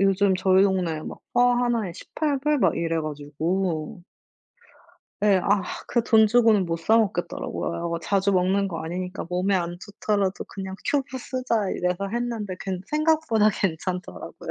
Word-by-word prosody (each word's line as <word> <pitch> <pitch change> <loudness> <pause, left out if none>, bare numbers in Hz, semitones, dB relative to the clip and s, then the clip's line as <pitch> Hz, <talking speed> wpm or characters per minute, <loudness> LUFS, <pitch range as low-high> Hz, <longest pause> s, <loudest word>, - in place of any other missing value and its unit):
요즘 195 0 +3
저희 190 0 +4
동네에 180 -5 +1 0.3
포 - - +2
하나에 240 -5 +2
$18 295 - -1
막 - - +2
이래 165 -1 0
가지고 155 +3 -3 1.2
예. 200 -3 +5
아 200 -1 +2 0.3
그 235 - +1
돈 220 -2 +5
주고는 225 -3 +4
못 165 -1 -2
사 215 +8 +3
먹겠더라고요. 175 -4 -1
'뭐 170 0 -2
자주 195 +4 +1
먹는 190 +2 +2
거 165 -3 -5
아니니까 180 +3 -4
몸에 180 +3 +1
안 175 -1 -2
좋더라도 200 -1 -1
그냥 190 -1 -7
큐브 275 -2 -1
쓰자.' 245 -6 -1
이래서 180 +2 -1
했는데 230 -3 -3
괜 185 -2 -3
생각보다 305 -8 +3
괜찮더라고요. 180 - -4
195 Hz, 300 characters per minute, -25 LUFS, 180-225 Hz, 1.2 s, 예